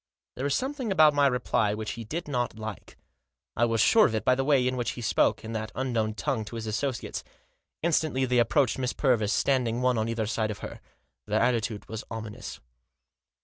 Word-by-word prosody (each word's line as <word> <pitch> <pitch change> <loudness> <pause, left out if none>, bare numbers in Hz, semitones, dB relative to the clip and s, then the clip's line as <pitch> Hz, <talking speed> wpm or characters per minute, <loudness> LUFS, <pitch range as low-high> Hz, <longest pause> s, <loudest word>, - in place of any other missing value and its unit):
There 130 - -4
was 140 - +1
something 265 -4 -2
about 155 -5 +6
my 145 -1 +4
reply 110 -5 +1
which 110 0 -4
he 115 - -6
did 160 +10 -5
not 125 -5 -2
like. 110 -2 -8 0.6
I 120 - +3
was 115 -2 +1
sure 220 - +6
of 110 - -3
it 110 - -2
by 130 - +5
the 135 +1 0
way 135 -3 +3
in 130 - 0
which 120 -2 -2
he 120 - -7
spoke, 115 - +2
in 115 - -5
that 110 -1 -4
unknown 115 -4 -1
tongue, 130 -3 -1
to 115 - -8
his 115 -1 -4
associates. 120 +4 -3 0.6
Instantly 155 -5 +1
they 125 -1 +2
approached 130 +1 +2
Miss 130 0 -1
Purvis, 115 -7 +2
standing 125 -3 +1
one 125 -2 +2
on 110 +1 -1
either 115 -1 -1
side 110 0 -1
of 105 - -5
her. - - -9 0.5
Their 105 +1 +1
attitude 115 -3 0
was 110 0 -6
ominous. 110 -2 -7
120 Hz, 205 wpm, -27 LUFS, 110-135 Hz, 0.6 s, about